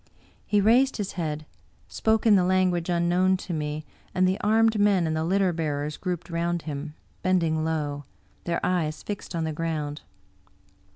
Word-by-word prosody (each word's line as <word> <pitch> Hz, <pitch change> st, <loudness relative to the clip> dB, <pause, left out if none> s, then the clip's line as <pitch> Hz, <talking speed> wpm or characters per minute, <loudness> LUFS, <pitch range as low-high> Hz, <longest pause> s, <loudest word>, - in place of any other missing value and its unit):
He 205 Hz, -1 st, +3 dB
raised 245 Hz, +6 st, +4 dB
his 205 Hz, -3 st, -3 dB
head, 155 Hz, -3 st, -3 dB, 0.4 s
spoke 220 Hz, 0 st, +1 dB
in 220 Hz, -, +6 dB
the 190 Hz, -3 st, +5 dB
language 180 Hz, -2 st, +1 dB
unknown 175 Hz, +2 st, +2 dB
to 180 Hz, -, -6 dB
me, 150 Hz, 0 st, -3 dB, 0.3 s
and 185 Hz, 0 st, +4 dB
the 190 Hz, +1 st, 0 dB
armed 220 Hz, +1 st, +3 dB
men 200 Hz, -4 st, +4 dB
and 160 Hz, 0 st, -1 dB
the 160 Hz, -, 0 dB
litter 185 Hz, +1 st, +2 dB
bearers 150 Hz, -2 st, -2 dB
grouped 180 Hz, -1 st, -4 dB
round 170 Hz, 0 st, -1 dB
him, 150 Hz, 0 st, -5 dB, 0.3 s
bending 165 Hz, -4 st, +1 dB
low, 145 Hz, -3 st, -2 dB, 0.4 s
their 170 Hz, -1 st, 0 dB
eyes 160 Hz, -4 st, -1 dB
fixed 205 Hz, -3 st, -6 dB
on 165 Hz, -, -1 dB
the 160 Hz, -1 st, -2 dB
ground. 155 Hz, -2 st, -3 dB
170 Hz, 165 wpm, -26 LUFS, 155-185 Hz, 0.4 s, in